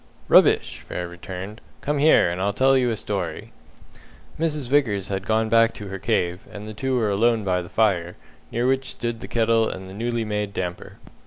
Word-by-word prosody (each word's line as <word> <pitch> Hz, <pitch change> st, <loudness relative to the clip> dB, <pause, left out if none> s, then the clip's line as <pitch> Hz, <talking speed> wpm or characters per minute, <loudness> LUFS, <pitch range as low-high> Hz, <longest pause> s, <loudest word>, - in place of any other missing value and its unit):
"Rubbish!" -, -, +4 dB
Frere 90 Hz, 0 st, -5 dB
returned. 95 Hz, +4 st, -8 dB, 0.2 s
"Come 145 Hz, 0 st, -1 dB
here, 145 Hz, -, +5 dB
and 90 Hz, +2 st, -3 dB
I'll 100 Hz, +1 st, 0 dB
tell 135 Hz, +5 st, +4 dB
you 125 Hz, -2 st, +2 dB
a 115 Hz, -, -1 dB
story." -, -, -4 dB, 0.9 s
Mrs. 150 Hz, -5 st, -1 dB
Vickers 115 Hz, -8 st, +1 dB
had 95 Hz, -1 st, -3 dB
gone 110 Hz, 0 st, +2 dB
back 115 Hz, 0 st, +4 dB
to 105 Hz, -2 st, -8 dB
her 95 Hz, 0 st, -5 dB
cave, 90 Hz, +3 st, -1 dB
and 105 Hz, 0 st, -8 dB
the 110 Hz, -, -7 dB
two 130 Hz, +4 st, -1 dB
were 110 Hz, -4 st, +1 dB
alone 115 Hz, +2 st, +2 dB
by 90 Hz, -2 st, 0 dB
the 85 Hz, -, -10 dB
fire, 90 Hz, -6 st, +1 dB, 0.4 s
near 120 Hz, +1 st, 0 dB
which 130 Hz, 0 st, +1 dB
stood 120 Hz, -2 st, -4 dB
the -, -, -8 dB
kettle 115 Hz, -1 st, +2 dB
and 95 Hz, 0 st, -7 dB
the 95 Hz, -, -10 dB
newly 115 Hz, +2 st, -2 dB
made 105 Hz, -1 st, -3 dB
damper. 90 Hz, -1 st, -5 dB
110 Hz, 195 wpm, -23 LUFS, 95-120 Hz, 0.9 s, here